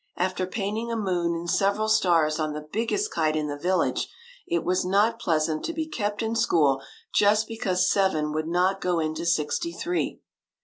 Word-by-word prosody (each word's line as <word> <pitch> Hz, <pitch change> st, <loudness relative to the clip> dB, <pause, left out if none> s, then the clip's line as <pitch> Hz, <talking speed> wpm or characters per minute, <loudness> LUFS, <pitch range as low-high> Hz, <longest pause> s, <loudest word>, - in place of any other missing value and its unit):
After 185 Hz, 0 st, -1 dB
painting 215 Hz, +4 st, -3 dB
a -, -, -1 dB
moon 180 Hz, -5 st, 0 dB
and 170 Hz, +1 st, -5 dB
several 200 Hz, +4 st, +1 dB
stars 165 Hz, -7 st, +3 dB
on 155 Hz, -1 st, -1 dB
the 150 Hz, 0 st, -7 dB
big 225 Hz, +2 st, 0 dB
gest 410 Hz, +2 st, 0 dB
kite 155 Hz, -1 st, +1 dB
in 155 Hz, -1 st, 0 dB
the 145 Hz, -1 st, -3 dB
village, 180 Hz, +6 st, 0 dB, 0.4 s
it 345 Hz, -1 st, 0 dB
was 180 Hz, 0 st, +1 dB
not 205 Hz, +5 st, +2 dB
pleasant 155 Hz, -4 st, 0 dB
to 335 Hz, -, -3 dB
be 320 Hz, 0 st, -2 dB
kept 210 Hz, -7 st, -3 dB
in 225 Hz, +1 st, -1 dB
school 145 Hz, -11 st, +3 dB, 0.3 s
just 210 Hz, +1 st, +4 dB
because 195 Hz, -6 st, 0 dB
seven 160 Hz, -7 st, +1 dB
would 155 Hz, +1 st, -2 dB
not 180 Hz, +3 st, +1 dB
go 180 Hz, -1 st, +1 dB
into 160 Hz, +1 st, -2 dB
sixty 170 Hz, -, 0 dB
three. 355 Hz, +1 st, -2 dB
185 Hz, 185 wpm, -26 LUFS, 160-220 Hz, 0.4 s, just